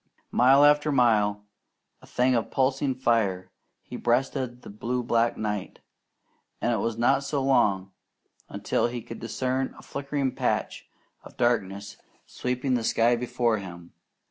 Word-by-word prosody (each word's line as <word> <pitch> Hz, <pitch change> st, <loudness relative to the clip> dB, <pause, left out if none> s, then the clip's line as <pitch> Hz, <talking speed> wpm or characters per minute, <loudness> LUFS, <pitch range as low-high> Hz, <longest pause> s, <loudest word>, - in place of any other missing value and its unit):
Mile 135 Hz, +4 st, +5 dB
after 150 Hz, +1 st, +4 dB
mile, 105 Hz, -6 st, +2 dB, 0.6 s
a -, -, -16 dB
thing 125 Hz, +1 st, +1 dB
of 115 Hz, -2 st, 0 dB
pulsing 135 Hz, 0 st, 0 dB
fire, 110 Hz, -7 st, 0 dB, 0.3 s
he -, -, -8 dB
breasted 125 Hz, 0 st, -1 dB
the -, -, -10 dB
blue 120 Hz, +4 st, -3 dB
black 115 Hz, 0 st, +1 dB
night, 105 Hz, -3 st, -4 dB, 0.8 s
and 120 Hz, -, 0 dB
it -, -, 0 dB
was 115 Hz, +2 st, -2 dB
not 120 Hz, +4 st, +2 dB
so 140 Hz, +1 st, -2 dB
very 135 Hz, 0 st, -1 dB
long 95 Hz, -7 st, +2 dB, 0.6 s
until -, -, -1 dB
he 120 Hz, -1 st, -6 dB
could 115 Hz, -, -9 dB
discern 130 Hz, +3 st, -2 dB
a -, -, -13 dB
flickering 140 Hz, -1 st, -3 dB
patch -, -, -2 dB, 0.3 s
of -, -, -15 dB
darkness 100 Hz, -4 st, -1 dB, 0.3 s
sweeping 125 Hz, +1 st, -2 dB
the 120 Hz, -2 st, 0 dB
sky 115 Hz, +1 st, +3 dB
before 120 Hz, -2 st, 0 dB
him. 85 Hz, -3 st, -10 dB
120 Hz, 145 wpm, -26 LUFS, 110-130 Hz, 0.8 s, Mile